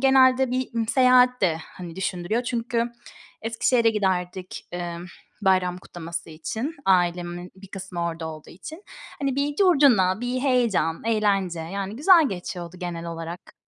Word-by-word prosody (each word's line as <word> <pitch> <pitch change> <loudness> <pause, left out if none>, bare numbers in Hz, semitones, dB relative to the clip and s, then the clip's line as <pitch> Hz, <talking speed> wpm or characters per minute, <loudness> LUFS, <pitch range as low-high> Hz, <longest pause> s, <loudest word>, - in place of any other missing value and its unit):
genelde 265 -1 +5
bir, 255 +1 -1
ımm, 225 -1 -1
seyahat 250 0 +5
de, 170 -4 +2
hani, 175 -2 -10
düşündürüyor 190 +4 -1
çünkü 235 -1 -1 0.5
Eskişehir'e 230 +1 +2
giderdik, 185 -3 -2
emm, 175 0 -5 0.4
bayram 185 -2 +2
kutlaması 170 -2 -7
için, 220 - -4
ailemin 175 -1 +1
bir 195 0 -13
kısmı 190 -2 -5
orada 165 -1 -3
olduğu 155 -1 -10
için. 310 - -10 0.4
Hani, 275 -2 -1
bir 285 +1 -1
curcuna, 270 - +4
bir 245 +1 -2
heyecan, 235 - +1
eğlence, 200 -6 +1
yani 195 +5 -5
güzel 325 +1 +6
geçiyordu 180 -2 -6
genel 170 -1 -4
olarak. 165 +1 -7
195 Hz, 135 wpm, -24 LUFS, 175-250 Hz, 0.5 s, güzel